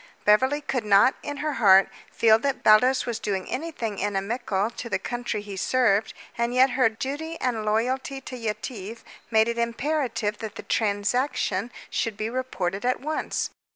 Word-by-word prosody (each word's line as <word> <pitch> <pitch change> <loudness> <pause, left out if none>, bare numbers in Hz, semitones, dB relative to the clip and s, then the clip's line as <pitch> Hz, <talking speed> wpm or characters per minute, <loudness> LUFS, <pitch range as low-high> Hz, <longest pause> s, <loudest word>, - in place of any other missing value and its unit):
Beverly 260 +8 +4
could 265 -5 -2
not, 210 +5 +5
in 290 -1 -5
her 305 - 0
heart, 195 -2 +7 0.2
feel 220 -1 +4
that 275 +2 -2
Baldos 250 +5 +5
was 235 -2 -3
doing 195 -4 -3
anything 255 -8 -4
inimical 205 +1 -1
to 235 0 -7
the 190 - +1
country 240 +1 -4
he 205 -1 -7
served, 220 0 +1 0.2
and 235 +1 -1
yet 260 +1 +5
her 255 -3 +3
duty 290 +8 -5
and 240 -4 -1
loyalty 255 +6 -1
to 255 - -8
Yetive 225 -1 -5 0.3
made 220 -1 +4
it 235 0 -2
imperative 235 -3 -1
that 220 -2 -6
the - - -8
transaction 210 0 0 0.2
should 225 -3 -2
be 220 +1 -3
reported 205 -7 -3
at 250 +1 +1
once. 305 +3 -2
230 Hz, 160 wpm, -25 LUFS, 210-260 Hz, 0.3 s, heart